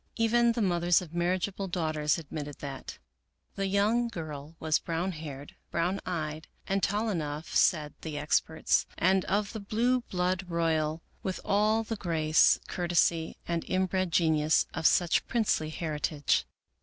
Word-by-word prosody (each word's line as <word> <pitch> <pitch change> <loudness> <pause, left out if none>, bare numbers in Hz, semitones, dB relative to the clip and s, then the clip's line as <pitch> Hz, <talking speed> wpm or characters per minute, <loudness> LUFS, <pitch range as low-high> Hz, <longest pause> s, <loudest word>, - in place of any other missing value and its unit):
Even 235 +1 +3
the 230 -2 0
mothers 175 -2 +3
of 170 -3 -10
marriageable 185 +3 -1
daughters 155 -4 0
adrnitted 150 -2 -6
that. 140 -2 -7 0.6
The 195 0 -2
young 210 +5 +2
girl 155 -7 -7
w^as 155 -1 +1
brown 170 +3 -1
haired, 145 -4 -8 0.2
brown 175 +4 0
eyed, 155 -3 -3 0.2
and 195 +1 0
tall 210 +3 0
enough, 155 -3 -4
said 150 -5 +3
the 155 -2 -5
experts, 160 +2 +1
and 190 +1 +3
of 200 +1 0
the 220 - -4
blue 235 +5 +1
blood 185 -3 -1
royal, 160 -1 0 0.2
with 190 -1 -3
all 215 +2 +2
the 225 0 -4
grace, 160 -4 +3
courtesy, 170 -2 +1
and 170 -1 -1
inbred 185 -1 0
genius 160 -2 +3
of 160 - +3
such 175 -2 +2
princely 210 -9 +1
heritage. 155 -2 -1
170 Hz, 145 wpm, -29 LUFS, 155-195 Hz, 0.6 s, Even